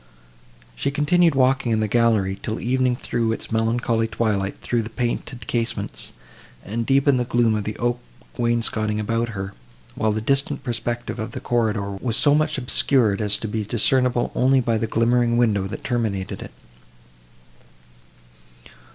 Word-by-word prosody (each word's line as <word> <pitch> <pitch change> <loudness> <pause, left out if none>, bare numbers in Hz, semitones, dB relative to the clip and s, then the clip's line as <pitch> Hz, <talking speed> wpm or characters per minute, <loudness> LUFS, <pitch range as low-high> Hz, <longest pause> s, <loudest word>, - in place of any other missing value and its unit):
She - - -1
continued 160 +3 +3
walking 130 -2 +2
in 110 - +2
the 110 - +1
gallery, 105 -4 +2
till 110 - -3
evening 125 0 +1
threw 115 -2 -1
its 115 - -5
melancholy 115 0 +1
twilight 105 -3 -1
through 120 -1 -1
the 110 - -6
painted 120 +1 -3
casements, 115 -1 -3 0.5
and 115 +3 -3
deepened 135 -1 +3
the - - +1
gloom 120 -2 +2
of 105 -2 -2
the 105 - -4
oak 120 0 0 0.4
wainscoting 115 -2 0
around 115 +2 -1
her; 95 -3 -5 0.4
while 110 -2 0
the 105 - -1
distant 140 +4 -1
perspective 120 -1 -3
of 110 - -5
the - - -4
corridor 110 -4 0
was 110 +4 -2
so 145 - +4
much 155 0 +1
obscured, 125 -4 +2
as 105 -1 +2
to 110 - -5
be 110 +1 -2
discernible 125 +3 +1
only 130 +1 +3
by 115 -3 0
the 115 - -1
glimmering 120 +1 +2
window, 105 -5 +2
that 95 - -7
terminated 110 -6 -2
it. - - -8
115 Hz, 155 wpm, -22 LUFS, 110-125 Hz, 0.5 s, so